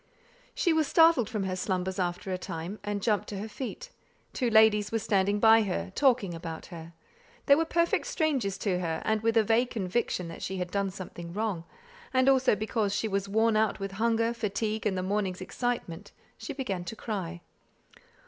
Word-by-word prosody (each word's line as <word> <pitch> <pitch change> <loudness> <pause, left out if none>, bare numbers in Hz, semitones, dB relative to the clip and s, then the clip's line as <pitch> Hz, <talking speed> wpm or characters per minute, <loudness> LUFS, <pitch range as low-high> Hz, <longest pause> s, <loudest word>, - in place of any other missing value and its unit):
She 345 - +2
was 315 -2 +2
startled 325 - +5
from 210 -3 -2
her 185 -1 -2
slumbers 185 0 -2
after 180 +1 -2
a - - -1
time, 175 +4 -6
and 205 -1 -3
jumped 210 -4 +1
to 205 - -5
her 205 +3 -4
feet. 275 - -7 0.4
Two 250 -3 0
ladies 220 -2 +5
were 225 - +1
standing 200 -1 +1
by 225 +1 +7
her, 190 -2 -2
talking 245 -9 +2
about 165 -1 -7
her. 165 0 -9 0.5
They 280 - +7
were 325 +3 +3
perfect 335 +1 +1
strangers 265 - 0
to 185 -4 -1
her, 165 -2 -2
and 220 -1 +1
with 230 +1 +1
a 225 - +6
vague 230 +3 +2
conviction 190 -4 -2
that 165 - -9
she 190 - -3
had 180 -1 -4
done 200 0 0
something 175 -2 -8
wrong, 205 -5 -2 0.5
and 255 0 +4
also 265 -4 +4
because 215 -1 -1
she 220 - 0
was 200 -1 -2
worn 220 +2 +2
out 215 -1 +1
with 195 0 -4
hunger, 230 +3 +1
fatigue, 215 -1 -2
and 190 -2 -1
the 185 - -1
morning's 190 -1 -1
excitement, 200 -3 -4 0.2
she - - -7
began 230 -11 -3
to 200 - -6
cry. 180 -7 -5
210 Hz, 190 wpm, -28 LUFS, 185-230 Hz, 0.5 s, by